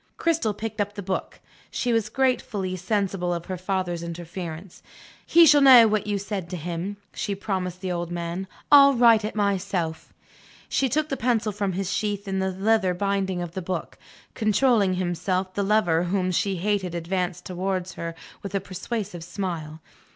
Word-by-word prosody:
Cristel 320 -11 0
picked 220 0 -4
up 205 0 -3
the 200 - -5
book. 190 0 -4 0.3
She 245 -1 -1
was 225 -2 +1
gratefully 215 -7 0
sensible 195 -2 -1
of 170 -1 -3
her 185 - -4
father's 185 -2 -2
interference. 170 +1 -7 0.5
"He 340 0 +7
shall 295 -2 +6
know 255 -4 +9
what 215 -1 0
you 205 -1 0
said 195 -3 -4
to 180 - -4
him," 175 +4 -4 0.2
she 200 -2 -3
promised 185 -3 -3
the 185 -2 -2
old 175 -1 -3
man. 175 +2 -4 0.2
"I'll 280 -1 +8
write 230 -3 +6
it 215 - -4
myself." 190 -5 -1 0.6
She 270 - +1
took 310 +4 0
the 275 - -2
pencil 230 -3 +1
from 200 -2 -2
its 190 0 -2
sheath 205 +1 -2
in 190 0 -1
the 190 0 0
leather 190 0 +1
binding 190 -1 -1
of 175 - -6
the 190 - -5
book. 185 +1 -5 0.3
Controlling 215 -3 +2
himself, 185 +1 -1
the 200 - -1
lover 195 -5 +2
whom 185 0 0
she 195 +2 0
hated 190 -1 -1
advanced 180 +1 -2
towards 185 0 -3
her 165 0 -5 0.3
with 200 0 -6
a - - +2
persuasive 190 -1 -5
smile. 170 -4 -5
190 Hz, 175 wpm, -25 LUFS, 180-210 Hz, 0.6 s, know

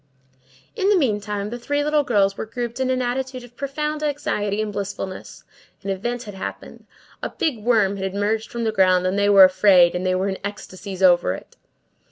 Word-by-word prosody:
In 395 -2 +1
the 415 - +4
meantime, 210 - -1
the 240 - -5
three 290 +4 -1
little 300 0 +2
girls 200 -7 +2
were 220 - -5
grouped 240 +1 -5
in 260 -1 0
an 255 -1 0
attitude 255 +1 -3
of 245 0 -15
profound 300 +3 -3
anxiety 275 -9 -1
and 215 -1 -2
blissfulness; 195 -1 -6 0.4
an 195 - -2
event 240 +6 -3
had 205 - -9
happened; 190 - -8 0.3
a - - -3
big 290 -9 -2
worm 210 -4 +2
had 190 0 -4
emerged 215 +2 -1
from 235 -1 -4
the 220 - +1
ground, 185 -3 +3
and 185 +1 0
they 200 0 +2
were 200 -1 +8
afraid; 185 -2 +5
and 180 - -3
they 185 0 +1
were 190 +2 0
in 190 -1 -3
ecstasies 195 -1 -6
over 175 - +4
it. - - -13
210 Hz, 200 wpm, -22 LUFS, 195-250 Hz, 0.4 s, were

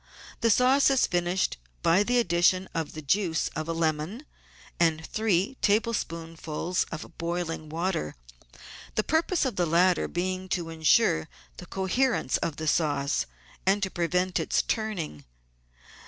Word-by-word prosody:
The 230 - +2
sauce 255 +6 +5
is 270 -2 +3
finished 175 +1 0 0.3
by 175 +4 +4
the 245 +4 +1
addition 185 -3 +3
of 160 -2 -3
the 155 - -7
juice 165 +2 +1
of 155 +1 -4
a - - 0
lemon 165 - -1 0.5
and 160 -1 +2
three 215 +4 0
tablespoonfuls 170 -6 -1
of 160 - -8
boiling 170 -2 -3
water 165 - -2 0.4
— - - -15
the 215 - +2
purpose 320 - +1
of 260 - -2
the 175 -1 +2
latter 175 +3 +3
being 185 +1 -3
to 170 -3 -2
ensure 160 - +3 0.3
the - - -10
coherence 195 - 0
of 160 - -3
the 155 +1 -5
sauce 145 -3 +1 0.4
and 195 +1 +2
to 190 - -1
prevent 180 +1 0
its - - +1
turning. 195 - -3
175 Hz, 140 wpm, -27 LUFS, 160-205 Hz, 0.5 s, sauce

